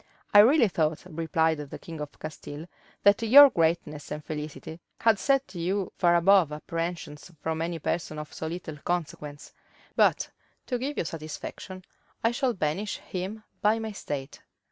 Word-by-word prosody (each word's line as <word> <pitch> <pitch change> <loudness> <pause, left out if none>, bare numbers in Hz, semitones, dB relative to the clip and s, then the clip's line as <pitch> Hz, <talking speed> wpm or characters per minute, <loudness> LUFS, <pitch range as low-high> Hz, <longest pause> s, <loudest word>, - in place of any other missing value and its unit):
"I 205 - +9
really 240 +3 +7
thought," 160 -4 0
replied 160 -2 0
the 145 -2 -7
king 165 -2 -9
of 150 -1 -7
Castile, 155 0 -8 0.4
"that 200 +2 +5
your 270 +5 +9
greatness 160 -3 0
and 150 0 -6
felicity 150 +1 -6 0.2
had 225 -3 +4
set 275 -7 +1
you 185 +2 -2
far 175 -1 +3
above 175 -2 +5
apprehensions 165 +1 -5
from 160 +1 -2
any 170 0 -2
person 160 0 -3
of 150 0 -7
so 160 - -5
little 160 -2 -6
consequence: 150 -3 -4 0.4
but, - - +3 0.3
to 250 -2 -2
give 280 +4 -3
you - - 0
satisfaction, 165 +4 -7 0.4
I 230 - +3
shall 245 0 0
banish 185 +5 -2
him 195 +4 -6 0.2
my 220 +1 +1
state." 145 -8 -6
170 Hz, 150 wpm, -27 LUFS, 155-205 Hz, 0.4 s, I